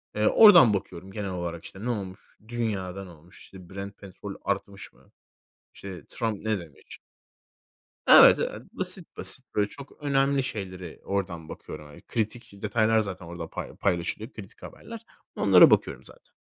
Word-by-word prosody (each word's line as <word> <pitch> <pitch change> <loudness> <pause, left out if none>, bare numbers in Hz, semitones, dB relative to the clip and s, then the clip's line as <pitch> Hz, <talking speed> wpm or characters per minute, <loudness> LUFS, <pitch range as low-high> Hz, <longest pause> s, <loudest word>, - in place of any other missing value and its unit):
Eee, 105 0 +2
oradan 175 - +8
bakıyorum 95 -1 -5
genel 100 -1 -4
olarak, 85 -2 -5
işte, 95 - -10
ne - - -1
olmuş? 100 -4 -6
Dünyada 100 -5 -3
ne 90 - -12
olmuş? 85 +2 -17
İşte, 90 -2 -14
Brent 100 +1 -8
Petrol 100 +1 -9
artmış 100 0 -4
mı? 65 - -25 0.6
İşte, 95 -5 -9
Trump 110 -2 -3
ne 110 -3 0
demiş? 80 -5 -13 1.1
Evet, - - +9
evet, - - -3
basit - - -3
basit. - - +1
Böyle 105 -1 +1
çok 140 +4 -13
önemli 140 -1 +2
şeylere 95 -7 -6
oradan 90 -5 -3
bakıyorum. 75 -1 -9
Hani, 75 - -14
kritik 115 0 -4
detaylar 110 +1 +2
zaten 95 -4 -4
orada 85 -1 -7
pay - - -7
paylaşılıyor, 100 +5 -2
kritik 100 -3 -12
haberler. 230 -1 -10 0.3
Onlara - - +7
bakıyorum - - +1
zaten. - - -13
100 Hz, 155 wpm, -26 LUFS, 90-110 Hz, 1.1 s, Evet